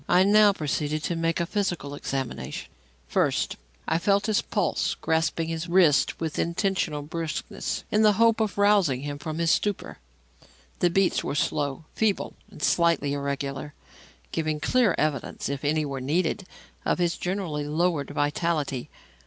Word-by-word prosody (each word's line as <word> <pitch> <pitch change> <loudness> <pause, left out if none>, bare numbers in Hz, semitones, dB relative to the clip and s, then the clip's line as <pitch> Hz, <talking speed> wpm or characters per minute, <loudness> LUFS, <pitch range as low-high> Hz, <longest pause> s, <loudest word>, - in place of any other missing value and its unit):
I 180 - +6
now 205 +1 +6
proceeded 150 -3 -2
to 170 - -1
make 165 0 0
a 170 - +1
physical 175 -7 -2
examination. 135 -3 -4 0.4
First, - - +1 0.3
I 165 - +2
felt 200 +3 +2
his 215 -2 +2
pulse, - - 0
grasping 160 0 0
his 165 +1 -3
wrist 170 -5 +4
with 160 -2 -3
intentional 170 -4 0
brusqueness 160 0 -4
in 210 - +3
the 215 -1 +6
hope 230 +2 +4
of 215 -3 -1
rousing 200 -10 +3
him 145 0 -5
from 155 +1 -5
his 165 -1 +2
stupor. 205 -2 -1 0.8
The 175 - +4
beats 195 +1 +2
were - - -3
slow, 145 0 -1
feeble 215 -3 0 0.2
and 150 - -10
slightly 165 -5 +2
irregular, 140 0 -3 0.6
giving 155 -2 -1
clear 225 - +3
evidence, 150 -3 -1
if 140 0 -4
any 155 +1 +1
were 135 -2 -4
needed, 165 +7 0 0.4
of - - +1
his 175 -2 +1
generally 175 -6 -3
lowered 155 -2 0
vitality. 145 -2 -1
165 Hz, 150 wpm, -26 LUFS, 145-185 Hz, 0.8 s, I